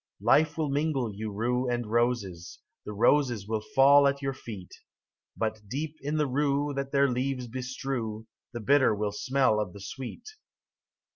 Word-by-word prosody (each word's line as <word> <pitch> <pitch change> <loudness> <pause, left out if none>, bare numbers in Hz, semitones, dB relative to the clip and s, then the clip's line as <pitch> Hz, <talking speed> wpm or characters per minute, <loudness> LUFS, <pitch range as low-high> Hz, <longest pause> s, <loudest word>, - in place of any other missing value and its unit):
Life 155 +1 +4
will 155 -3 -1
mingle 140 -6 0
you 110 +1 -5
rue 125 +4 -1
and 120 -1 -1
roses; 110 -7 -1 0.3
The - - -5
roses 115 -1 +2
will 110 -1 -1
fall 140 +5 +5
at 140 0 0
your 135 -1 -2
feet: 105 -8 -9 0.7
But 110 -1 -2
deep 150 +7 -4
in 150 +3 -2
the 150 - +2
rue 145 +1 0
That 140 0 -4
their 140 -1 +4
leaves 130 0 -2
bestrew 125 -3 -4 0.3
The 120 - -6
bitter 130 0 +4
will 105 0 -1
smell 130 0 +1
of 100 -4 -3
the 100 - -10
sweet. 130 - -8
125 Hz, 160 wpm, -28 LUFS, 110-140 Hz, 0.7 s, fall